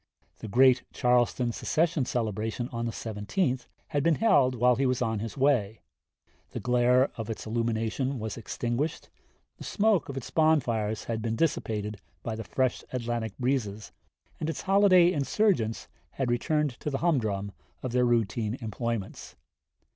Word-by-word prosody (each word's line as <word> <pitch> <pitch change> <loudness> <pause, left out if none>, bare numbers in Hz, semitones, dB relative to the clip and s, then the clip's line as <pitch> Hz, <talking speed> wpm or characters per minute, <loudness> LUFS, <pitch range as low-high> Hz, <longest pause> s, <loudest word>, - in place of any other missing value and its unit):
The - - -7
great 125 +3 +5
Charleston 125 0 +2
secession 160 +3 0
celebration 115 +1 -2
on 115 -1 -3
the - - -2
17th 115 - -2 0.2
had 145 -2 0
been 165 +2 +3
held 135 - +3
while 125 +1 +4
he 135 +2 +1
was 125 -1 0
on 110 -3 -1
his 110 +2 -6
way; 125 -7 +1 0.7
the - - -3
glare 125 +2 +3
of 115 -1 -5
its 110 - -5
illumination 115 +4 -1
was 110 -1 -4
extinguished, 120 +6 -3 0.5
the - - -9
smoke 210 -8 +1
of 135 - -5
its 130 - -6
bonfires 120 -9 +1
had 115 -1 -3
been 115 0 -1
dissipated 105 -8 -1 0.2
by 115 - -3
the 110 - -5
fresh 130 +5 -1
Atlantic 120 -4 -3
breezes, 120 -5 -2 0.5
and 155 - -2
its 165 - -4
holiday 190 -3 +5
insurgents 145 - 0 0.3
had 130 -3 -1
returned 145 +2 0
to - - -3
the 135 - -1
humdrum 110 - 0 0.3
of 130 - -3
their 125 +1 +2
routine 115 -1 0
employments. 115 -2 -4
120 Hz, 150 wpm, -28 LUFS, 110-140 Hz, 0.7 s, great